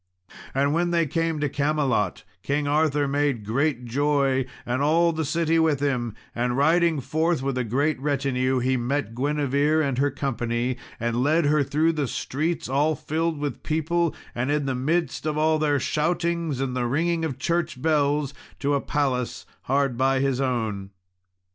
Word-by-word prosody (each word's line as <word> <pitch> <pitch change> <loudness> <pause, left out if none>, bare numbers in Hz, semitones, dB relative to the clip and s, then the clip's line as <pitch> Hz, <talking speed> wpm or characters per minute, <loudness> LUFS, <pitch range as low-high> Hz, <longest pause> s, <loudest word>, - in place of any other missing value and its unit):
And 140 +2 +2
when 175 +2 +1
they 170 -1 +2
came 165 +1 -1
to 145 - +2
Camelot, 145 -1 0 0.2
King 145 +1 -1
Arthur 150 -1 +2
made 140 -5 0
great 125 +3 0
joy, 135 0 +1 0.2
and 125 +2 -1
all 165 +3 +3
the 160 0 -1
city 165 +2 +1
with 160 -4 +2
him; 125 -6 -1 0.2
and 120 +1 -1
riding 165 +2 +3
forth 160 +2 0
with 135 -1 -1
a 125 - 0
great 140 +6 0
retinue 135 -2 0
he 130 +1 +1
met 120 -2 -2
Guinevere 145 +3 +1
and 135 -2 -1
her 145 +1 +3
company, 125 -3 -2 0.2
and 120 +1 0
led 155 +4 +3
her 150 +1 +3
through 155 +4 +2
the 150 -4 -1
streets 155 +8 -2
all 145 +4 +2
filled 160 +3 -2
with 145 -4 -4
people, 160 +2 0 0.2
and 125 +3 -2
in 145 -1 +1
the 135 - 0
midst 155 +5 -1
of 150 -1 -1
all 155 0 +2
their 145 -2 +2
shoutings 170 0 -1
and 130 -2 -2
the 125 -1 0
ringing 165 +6 0
of 145 -6 -2
church 170 -2 -1
bells, 145 -1 +1 0.2
to 145 +1 0
a 140 - +1
palace 130 -4 -1 0.2
hard 135 -2 +1
by 135 +1 +2
his 135 -1 0
own. 110 -7 -2
145 Hz, 170 wpm, -25 LUFS, 130-155 Hz, 0.2 s, all